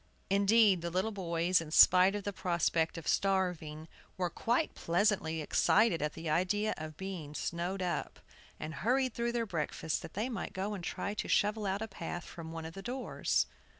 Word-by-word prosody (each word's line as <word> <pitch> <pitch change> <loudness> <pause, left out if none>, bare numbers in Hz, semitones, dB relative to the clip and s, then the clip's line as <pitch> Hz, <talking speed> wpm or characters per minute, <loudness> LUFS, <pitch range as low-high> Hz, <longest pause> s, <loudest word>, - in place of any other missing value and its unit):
Indeed, 200 -1 +5
the 170 - -3
little 185 +6 0
boys, 175 -2 +1
in 160 - -7
spite 185 +4 +7
of 205 - -3
the 205 - -3
prospect 170 -2 0
of 165 - -7
starving, 180 -5 0 0.3
were 180 -2 -1
quite 245 +7 0
pleasantly 175 -3 +1
excited 190 +3 +3
at 150 0 -1
the 165 0 -7
idea 185 +7 +1
of 155 -1 -8
being 180 -6 -6
snowed 175 +4 -2
up, 175 -1 -3 0.4
and 155 - -5
hurried 255 +4 +2
through 235 0 -1
their 235 -1 0
breakfasts 160 -3 -2
that - - -10
they 215 +5 -1
might 225 -6 -5
go 200 +2 -2
and 190 -4 -6
try 200 +4 -3
to 210 - -4
shovel 210 0 +1
out 195 +3 -1
a - - -4
path 175 -3 -6
from 165 -1 -9
one 165 0 -6
of 160 - -7
the 195 - -8
doors. 250 +5 -1
185 Hz, 185 wpm, -32 LUFS, 165-205 Hz, 0.4 s, spite